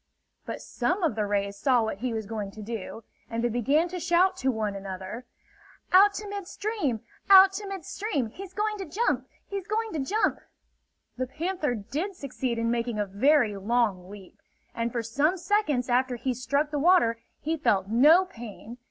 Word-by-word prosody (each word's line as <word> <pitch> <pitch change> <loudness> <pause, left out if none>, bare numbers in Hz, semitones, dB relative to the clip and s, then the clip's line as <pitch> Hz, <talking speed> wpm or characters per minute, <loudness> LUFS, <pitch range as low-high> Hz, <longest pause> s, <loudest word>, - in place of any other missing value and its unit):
But - - -5
some 370 +1 -1
of 325 - +2
the 210 -1 -1
rays 200 0 -1
saw 245 +2 +3
what 220 -3 -3
he 250 +2 -2
was 220 -2 -3
going 210 -1 -4
to 215 - -9
do, 225 0 -6 0.3
and 230 0 -2
they 240 - +2
began 275 +8 +2
to 360 +1 -5
shout 355 +3 +3
to 265 - 0
one 215 -4 -1
another: 195 +4 -7 0.7
"Out 400 +2 +7
to 420 +1 -5
mid 400 -2 -5
stream! 385 - -2 0.3
Out 385 0 +9
to 405 +1 -5
mid 385 -5 -6
stream! 290 - -2
He's 390 - -9
going 425 0 -1
to 385 - -4
jump! 395 +9 -1 0.2
He's 395 -2 -5
going 440 +1 -1
to 315 - -2
jump!" 400 +12 0 0.8
The 255 0 -2
panther 310 -1 -2
did 305 - -4
succeed 260 -5 -3
in 230 0 0
making 235 -1 -1
a 210 - 0
very 225 +3 +3
long 200 -3 0
leap, 200 -2 -12 0.3
and 230 0 -2
for 235 -1 -2
some 285 +11 +1
seconds 345 - +1
after 250 0 +1
he 255 +2 -2
struck 280 +5 -1
the 295 - -1
water 295 -8 +4 0.2
he 320 +2 -1
felt 200 -11 +1
no 295 - +6
pain. 235 - -10
255 Hz, 185 wpm, -27 LUFS, 225-365 Hz, 0.8 s, Out